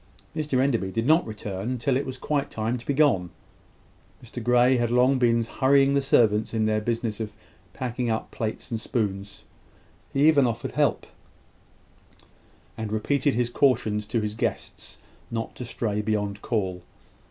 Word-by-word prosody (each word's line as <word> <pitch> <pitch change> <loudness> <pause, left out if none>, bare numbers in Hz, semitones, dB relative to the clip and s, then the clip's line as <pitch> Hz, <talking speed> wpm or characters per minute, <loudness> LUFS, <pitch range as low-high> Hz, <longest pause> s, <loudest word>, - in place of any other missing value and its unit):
Mr 150 -4 0
Enderby 120 -8 +1
did 115 +3 -1
not 160 +2 +4
return 105 +2 -4
till 125 +3 0
it 140 +2 -1
was 130 0 -5
quite 145 +1 -1
time 110 +2 -2
to 120 - -9
be 140 - +1
gone. 130 - +3 0.9
Mr 120 0 -7
Grey 125 +2 +4
had 120 -1 0
long 125 +2 +3
been 115 -1 +3
hurrying 135 +4 +3
the 140 - +3
servants 110 -5 +2
in 110 -1 +1
their 110 0 +1
business 115 -1 -2
of 110 -2 -4 0.4
packing 125 -1 -3
up 110 0 -2
plates 110 +2 -5
and 115 -1 -2
spoons. 100 -4 -3 0.7
He 140 +2 +3
even 145 -5 +5
offered 115 0 -3
help, - - +1 1.7
and 110 -2 -5
repeated 135 +6 +1
his 120 0 0
cautions 110 -6 +1
to 115 0 0
his 105 0 -3
guests 110 - -4 0.3
not 115 -1 -4
to 125 - -5
stray 105 -3 -2
beyond 105 -1 -2
call. 95 -6 -2
115 Hz, 160 wpm, -25 LUFS, 110-130 Hz, 1.7 s, even